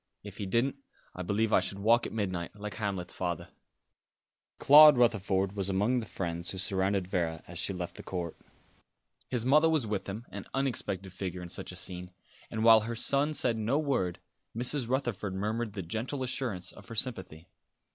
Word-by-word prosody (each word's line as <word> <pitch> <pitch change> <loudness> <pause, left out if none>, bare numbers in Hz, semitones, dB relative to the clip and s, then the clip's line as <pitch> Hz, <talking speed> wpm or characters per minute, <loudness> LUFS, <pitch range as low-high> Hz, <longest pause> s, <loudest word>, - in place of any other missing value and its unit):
If 100 -1 -10
he 100 - -4
didn't, 120 +8 +1 0.4
I 90 - -6
believe 105 +4 0
I - - +6
should 95 +1 -2
walk 115 +4 +3
at - - -9
midnight, 95 -5 -3
like 105 0 -6
Hamlet's 100 -5 -3
father." 90 -3 -3 1.1
Claude 150 0 +9
Rutherford 100 -5 +2
was 100 -1 -2
among 105 +7 +1
the 110 - -6
friends 85 -2 -4
who 95 - -5
surrounded 95 0 0
Vera 85 -4 -2
as 85 0 -5
she - - 0
left 90 -2 -5
the - - -7
court. 85 -3 -5 0.9
His 120 -2 -2
mother 150 +5 +5
was 155 -6 +1
with 100 -2 -3
him, 110 +5 -6
an 100 -1 -7
unexpected 100 -8 -2
figure 90 -1 -5
in 90 - -8
such - - -2
a - - -9
scene; 90 0 0 0.4
and 110 - -3
while 115 -1 +8
her 115 +2 -4
son 140 +6 +3
said 120 -5 +2
no 110 +6 0
word, 130 - 0 0.4
Mrs. 125 0 +1
Rutherford 120 -7 -2
murmured 110 +2 -2
the 100 -2 -5
gentle 115 - -3
assurance 125 -8 -2
of - - -14
her 115 - -8
sympathy. 95 -8 -3
105 Hz, 185 wpm, -30 LUFS, 95-120 Hz, 1.1 s, Claude